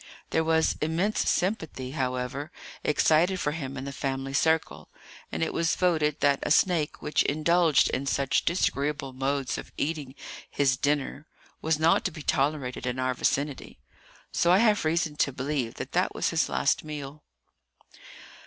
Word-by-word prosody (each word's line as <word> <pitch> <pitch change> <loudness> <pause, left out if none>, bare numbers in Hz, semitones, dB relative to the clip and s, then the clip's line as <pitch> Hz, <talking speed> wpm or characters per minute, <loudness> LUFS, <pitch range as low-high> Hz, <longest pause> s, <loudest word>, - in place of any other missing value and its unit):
There 160 - +2
was 160 0 +2
immense 170 +7 0
sympathy, 160 -9 -1
however, 130 +1 -3 0.3
excited 165 +5 +3
for 145 - 0
him 140 -3 -5
in 130 - -5
the 140 - -5
family 135 0 -3
circle; 160 +3 0 0.4
and - - -1
it 160 - -2
was 165 0 +1
voted 160 -5 +1
that 140 -1 +3
a - - -2
snake 160 -1 +2
which 150 - +1
indulged 160 +1 +3
in 140 +2 -2
such 140 -1 +1
very 170 - 0
disagreeable 140 -5 -1
modes 135 0 -1
of - - -10
eating 145 -3 -3 0.3
his 135 -2 +2
dinner 145 +2 -1 0.3
was 160 -1 +1
not 160 +2 +3
to - - 0
be 155 -1 -9
tolerated 135 -3 -1
in 125 +1 -2
our 130 0 0
vicinity. 140 +2 -2 0.5
So 170 - +2
I 185 - +6
have 210 -4 +3
reason 155 -1 0
to 140 - +2
believe 130 -2 -3
that - - -6
that - - 0
was - - 0
his - - +1
last - - +1
meal. 150 -1 -7
150 Hz, 160 wpm, -27 LUFS, 135-160 Hz, 0.5 s, I